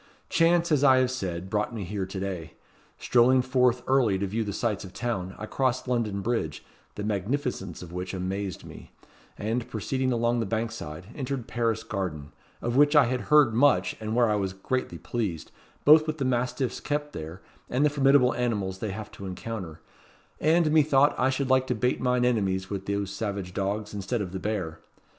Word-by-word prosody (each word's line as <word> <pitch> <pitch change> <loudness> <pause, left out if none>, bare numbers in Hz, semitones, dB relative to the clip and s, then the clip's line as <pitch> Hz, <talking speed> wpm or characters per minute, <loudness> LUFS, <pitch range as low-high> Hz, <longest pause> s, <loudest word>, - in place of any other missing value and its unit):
Chance, 170 0 +3
as 145 -2 +3
I 130 -2 +7
have 130 -1 +2
said, 95 -7 -4
brought 105 +3 -1
me 105 - -4
here 95 0 -3
to 95 0 -5
day. 90 -5 -5 0.4
Strolling 125 +1 +4
forth 125 -1 +2
early 125 -7 +3
to 100 - -1
view 110 +4 -1
the 105 - -4
sights 105 0 -1
of 95 - -10
town, 100 -6 -3
I 110 - -5
crossed 130 +2 -1
London 115 -5 0
Bridge, 105 -9 -2 0.3
the 105 - -4
magnificence 105 - -2
of 85 -1 -10
which 90 +1 -4
amazed 95 0 -4
me; - - -11 0.5
and, 115 +3 -2
proceeding 130 +4 -1
along 120 0 +1
the 115 - -1
Bankside, 110 -6 -4
entered 135 -3 -4
Paris 115 -2 -1
Garden, 90 -10 -4 0.3
of 120 +1 -1
which 145 +2 +5
I 145 -3 +7
had 125 +1 -1
heard 150 -6 +6
much, 110 -8 +3
and 110 0 -3
where 120 -1 +4
I 105 - +2
was 95 -2 -2
greatly 130 +7 -3
pleased, 100 - -4 0.3
both 155 +1 +7
with 155 0 -2
the 135 - -1
mastiffs 125 0 -1
kept 150 0 -3
there, 80 +4 -7 0.3
and 130 +4 +2
the 150 - +3
formidable 135 -3 +4
animals 105 -6 -1
they 110 - -3
have 110 +1 -7
to 100 - -8
encounter; 90 -4 -6 0.6
and, 160 +1 +3
methought, 145 -2 +4
I 130 - +3
should 135 0 -1
like 130 0 +3
to 125 - 0
bait 125 +3 0
mine 125 -1 +2
enemies 95 -6 0
with 95 -1 -4
those 100 -1 -1
savage 100 -3 -4
dogs, 105 +2 -2
instead 105 +3 -2
of 90 - -6
the 95 - -4
bear. 90 -6 -3
115 Hz, 190 wpm, -27 LUFS, 95-130 Hz, 0.6 s, I